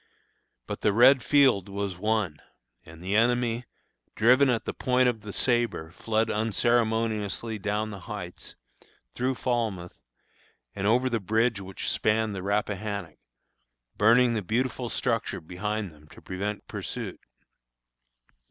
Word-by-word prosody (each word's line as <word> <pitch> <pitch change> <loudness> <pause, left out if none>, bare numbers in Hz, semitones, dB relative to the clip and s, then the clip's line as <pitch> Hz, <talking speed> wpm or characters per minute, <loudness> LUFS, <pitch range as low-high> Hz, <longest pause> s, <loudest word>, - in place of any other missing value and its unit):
But - - -6
the 105 - +2
red 125 +4 +6
field 130 -10 +4
was 100 -1 -3
won; 105 -4 -1 0.4
and 80 +1 -13
the 95 +3 -1
enemy, 120 +1 +2 0.5
driven 130 +5 +5
at 115 -3 0
the - - -3
point 125 0 +2
of 115 -3 -1
the 105 0 -7
sabre 120 -10 0
fled 110 +5 0
unceremoniously 110 -1 0
down 105 +2 -2
the 100 - -7
Heights, - - -7 0.6
through 130 +2 -1
Falmouth, 110 -9 -2 0.7
and 100 0 -2
over 125 +4 +3
the 120 -3 0
bridge 110 +2 +1
which 95 0 -6
spanned 110 0 +1
the 95 - -4
Rappahannock, 100 -3 -2 0.8
burning 120 +3 +5
the 110 - -1
beautiful 120 +4 -1
structure 115 -6 -1
behind 100 +4 -4
them 75 0 -19
to - - -15
prevent 100 +3 -4
pursuit. - - -5
110 Hz, 130 wpm, -27 LUFS, 100-120 Hz, 0.8 s, red